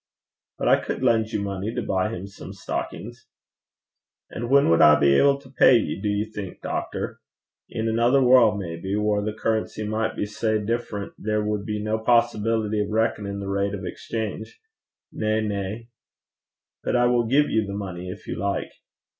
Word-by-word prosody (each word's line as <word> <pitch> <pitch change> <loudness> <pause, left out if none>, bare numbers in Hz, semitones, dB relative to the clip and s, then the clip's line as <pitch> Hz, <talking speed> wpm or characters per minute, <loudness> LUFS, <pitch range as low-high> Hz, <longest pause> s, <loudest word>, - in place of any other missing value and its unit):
'But - - -2
I - - +4
could - - -4
lend 115 -3 +2
you - - 0
the 100 - -3
money 100 +3 -4
to - - -1
buy 95 +2 0
him 95 -3 -6
some 100 -1 -10
stockings.' 100 - -6 1.0
'An' 120 +1 -5
whan 140 +1 +5
wad 85 - +4
I 75 -2 +7
be 70 -1 +4
able 140 - +4
to 140 -1 -16
pay 130 -2 +6
ye, 110 - -2
do 105 - -1
ye 105 +1 0
think, 105 -4 -8
doctor? - - -4 0.5
In 110 0 -3
anither 120 +4 +3
warl' 125 -5 +5
maybe, 95 +1 -4
whaur 105 -1 +1
the 105 - -1
currency 110 0 -2
micht 110 +1 -1
be - - -1
sae 110 +1 -1
different 105 -1 -3
there 105 0 -1
wad 105 -1 -2
be 105 -1 -2
no 110 +1 -1
possibility 110 -2 +1
o' 105 - -2
reckonin' 105 -2 -1
the 100 - -5
rate 100 +1 -1
o' 95 - -7
exchange. 110 +4 -5 0.5
Na, 110 0 0
na.' 105 +1 -3 1.0
'But - - 0
I 120 0 +4
will 120 -1 +2
give 145 +5 +3
you 110 -2 +1
the 100 - -5
money 90 -3 -6
if 100 +3 -9
you - - -4
like.' 100 -1 -2
105 Hz, 185 wpm, -24 LUFS, 100-115 Hz, 1.0 s, I